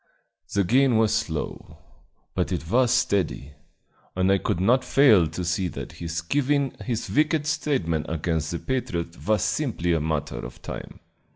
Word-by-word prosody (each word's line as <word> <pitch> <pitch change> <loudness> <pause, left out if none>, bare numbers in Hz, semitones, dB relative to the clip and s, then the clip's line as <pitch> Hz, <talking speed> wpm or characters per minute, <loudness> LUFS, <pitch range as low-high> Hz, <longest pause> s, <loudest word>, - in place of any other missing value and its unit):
The 100 - +2
gain 125 +4 +3
was 110 -1 +3
slow, 80 -8 -3 0.6
but - - -1
it 80 - -3
was 125 0 +4
steady, 100 - 0 0.6
and 95 +1 +2
I 100 - +3
could 85 - -1
not 125 +7 +3
fail 110 - +5
to 85 +4 -5
see 85 +2 0
that - - -7
his 85 0 -4
giving 140 - +1
his 120 -3 -2
wicked 155 +1 +2
testimony 135 - -1
against 80 -1 -1
the 85 - -2
patriots 85 -9 -3
was 105 -3 +2
simply 105 - 0
a 80 - +1
matter 75 -5 -2
of - - -8
time. - - -8
95 Hz, 160 wpm, -25 LUFS, 85-130 Hz, 0.6 s, fail